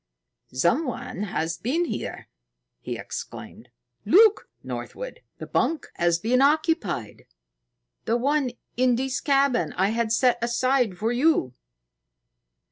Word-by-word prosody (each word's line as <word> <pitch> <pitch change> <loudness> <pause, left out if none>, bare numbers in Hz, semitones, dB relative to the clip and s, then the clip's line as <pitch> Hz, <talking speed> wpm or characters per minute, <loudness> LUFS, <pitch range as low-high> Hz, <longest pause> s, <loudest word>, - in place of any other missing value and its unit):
"Someone 195 - -1
has 165 -4 -3
been 315 +10 0
here!" - - -5 0.5
he - - -5
exclaimed. - - -8 0.3
"Look, 435 +2 +5
Northwood! - - -6 0.2
The - - -7
bunk 325 - -1
has 170 -1 +2
been 235 +8 +1
occupied 290 - 0 0.8
the 230 - +1
one 275 +2 +1 0.3
in 250 0 +3
this 260 +1 -2
cabin 275 -3 +2
I 190 +2 +3
had 230 0 -1
set 245 +1 +3
aside 240 -4 +1
for 220 +4 0
you." 245 - +2
250 Hz, 115 wpm, -25 LUFS, 215-290 Hz, 0.8 s, Look